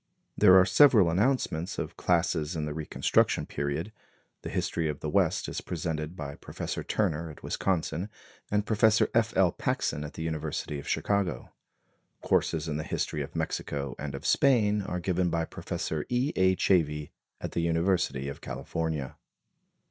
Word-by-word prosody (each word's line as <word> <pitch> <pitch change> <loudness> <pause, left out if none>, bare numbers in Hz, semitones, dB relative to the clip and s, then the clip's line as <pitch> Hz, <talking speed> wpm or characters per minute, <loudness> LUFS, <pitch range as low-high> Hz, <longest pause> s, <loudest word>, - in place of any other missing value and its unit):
There 95 - +7
are 95 - +7
several 100 - +6
announcements 95 -4 0
of - - -4
classes 85 -2 +1
in 80 -2 -2
the 75 - -3
Reconstruction 80 0 +1
period. 70 +8 -3 0.5
The - - -6
history 80 -2 -1
of 75 - -4
the 75 - -4
West - - +2
is - - -4
presented 80 -1 -4
by 70 -3 -6
Professor - - -5
Turner 80 +2 -1
at 75 - -12
Wisconsin, 90 0 -1 0.4
and 105 0 +1
Professor 110 0 +3
F. 115 -2 +1
L. 95 -2 +5
Paxson 75 - -1
at 75 - -7
the 80 - -4
University 80 -2 -3
of - - -10
Chicago. 100 -3 -1 0.7
Courses 80 0 +1
in 75 -2 -2
the 75 - -3
history - - -2
of - - -7
Mexico 70 -2 -3
and 70 -1 -4
of 70 - -8
Spain 105 -7 +3
are 90 -2 -3
given 90 0 0
by 85 -1 0
Prof. - - -5 0.2
E. 125 +4 0
A. 95 0 +4
Chavey 75 -6 +1 0.3
at - - -5
the 85 - -1
University 85 -5 +1
of 70 - -6
California. 80 -5 -4
85 Hz, 160 wpm, -28 LUFS, 75-95 Hz, 0.7 s, There